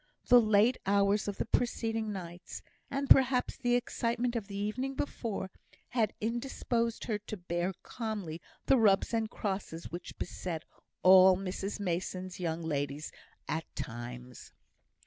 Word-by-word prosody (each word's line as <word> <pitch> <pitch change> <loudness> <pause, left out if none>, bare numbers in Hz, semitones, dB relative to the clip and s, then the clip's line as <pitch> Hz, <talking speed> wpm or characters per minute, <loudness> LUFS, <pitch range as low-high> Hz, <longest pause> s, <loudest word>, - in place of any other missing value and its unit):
The 245 0 +8
late 215 +3 +4
hours 200 +1 +3
of 205 - -3
the - - -1
preceding 225 -2 0
nights, 175 -2 -7 0.3
and 275 0 -2
perhaps 265 -2 +5
the 245 -2 +1
excitement 240 0 -1
of 220 -4 -2
the 200 -1 -6
evening 255 +7 -2
before, 220 -9 -3 0.4
had 225 -4 +1
indisposed 235 0 -1
her 215 -3 -1
to 210 +1 -7
bear 175 +1 -1
calmly 205 -9 -4 0.2
the 270 - +5
rubs 205 -2 +4
and 225 -1 +1
crosses 190 -6 -4
which 175 +2 -7
beset 175 -3 -4 0.4
all 185 0 +8
Mrs 195 +2 -4
Mason's 185 0 -3
young 165 -1 -2
ladies 145 -1 -2 0.4
at 160 +1 -2
times. 120 +1 -7
200 Hz, 135 wpm, -31 LUFS, 175-230 Hz, 0.4 s, The